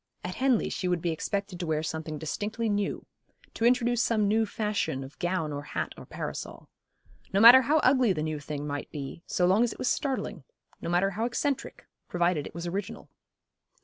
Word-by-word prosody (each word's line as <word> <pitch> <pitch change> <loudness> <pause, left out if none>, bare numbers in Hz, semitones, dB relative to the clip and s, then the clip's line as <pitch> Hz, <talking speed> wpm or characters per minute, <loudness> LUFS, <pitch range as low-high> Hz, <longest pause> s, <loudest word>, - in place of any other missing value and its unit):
At 180 - -4
Henley 255 -1 +2
she 185 - -2
would 180 -1 +1
be 170 0 -1
expected 195 +3 -3
to 175 - -3
wear 155 -1 0
something 160 -1 -4
distinctly 210 +9 -3
new, 205 -1 -1 0.5
to 225 - -1
introduce 240 -1 +3
some 220 -4 +2
new 220 +2 +2
fashion 205 -11 -2
of 135 +2 -12
gown 175 -4 -1
or 145 - -4
hat 145 - -4
or - - -12
parasol. - - -6 0.6
No 195 - +2
matter 240 +4 +10
how 290 +5 +2
ugly 255 -4 +4
the 155 -4 -1
new 155 -1 -2
thing 145 0 -5
might 145 -1 -4
be, 145 +2 -7
so 180 - +1
long 190 +6 +4
as 240 - 0
it - - -15
was - - 0
startling; 270 -3 -2 0.4
no - - -4
matter 180 +3 +2
how 220 +4 -2
eccentric, 270 +3 -2 0.2
provided 175 -4 +1
it - - -13
was 170 0 -5
original. 185 +2 -5
190 Hz, 195 wpm, -28 LUFS, 160-230 Hz, 0.6 s, matter